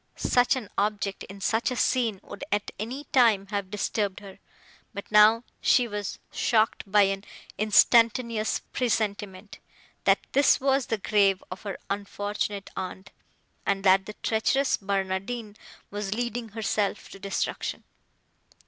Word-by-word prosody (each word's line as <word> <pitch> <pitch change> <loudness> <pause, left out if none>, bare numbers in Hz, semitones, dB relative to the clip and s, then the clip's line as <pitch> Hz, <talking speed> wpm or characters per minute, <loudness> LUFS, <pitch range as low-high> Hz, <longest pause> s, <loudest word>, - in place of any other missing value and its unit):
Such 245 +1 +2
an 250 -5 -5
object, 205 -1 -1
in 195 +1 -11
such 225 +5 +1
a 250 - -3
scene, 230 -5 +1
would, - - -9
at 205 0 -1
any 250 +7 -4
time, 225 -7 +4
have 200 -2 -2
disturbed 205 -1 -2
her; 200 -2 -12 0.6
but 200 - -5
now 215 +2 +6 0.2
she 250 -3 +4
was 205 -2 -4
shocked 220 -1 +1
by 205 0 +6
an 195 0 -1 0.4
instantaneous 230 +1 +3
presentiment, 205 -4 -2 0.5
that - - +5
this 280 0 +4
was 270 -1 +1
the 225 - 0
grave 200 -2 +2
of 185 - -7
her 200 -3 -5
unfortunate 205 0 -3
aunt, 190 +1 -6 0.5
and 195 0 -1
that 190 0 +4
the 210 - -6
treacherous 260 +5 +2
Barnardine 200 +3 -3 0.4
was 205 0 -3
leading 240 -1 -3
herself 210 -1 -2
to 195 - -11
destruction. 195 0 -3
210 Hz, 135 wpm, -26 LUFS, 195-230 Hz, 0.6 s, now